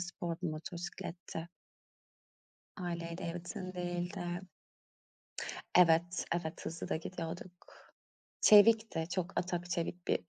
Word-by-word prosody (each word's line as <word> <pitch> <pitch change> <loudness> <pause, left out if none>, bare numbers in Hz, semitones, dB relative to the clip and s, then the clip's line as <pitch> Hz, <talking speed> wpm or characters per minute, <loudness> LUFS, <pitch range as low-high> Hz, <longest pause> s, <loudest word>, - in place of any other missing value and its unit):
spor 175 -1 -3
bir 175 - +1
motosikletti. 170 +1 -5 1.3
Harley 170 -2 -3
Davidson 180 +3 -5
değildi. 175 +1 -2 1.6
Evet, 170 0 +5
evet, 160 -2 -4
hızlı 165 +1 -4
da - - +2
gidiyorduk. 170 +2 -5 0.9
Çevikti, 215 -5 +7
çok 185 +1 -1
atak 175 -1 -2
çevik 175 +1 -2
bir - - +3
175 Hz, 95 wpm, -34 LUFS, 170-180 Hz, 1.6 s, Çevikti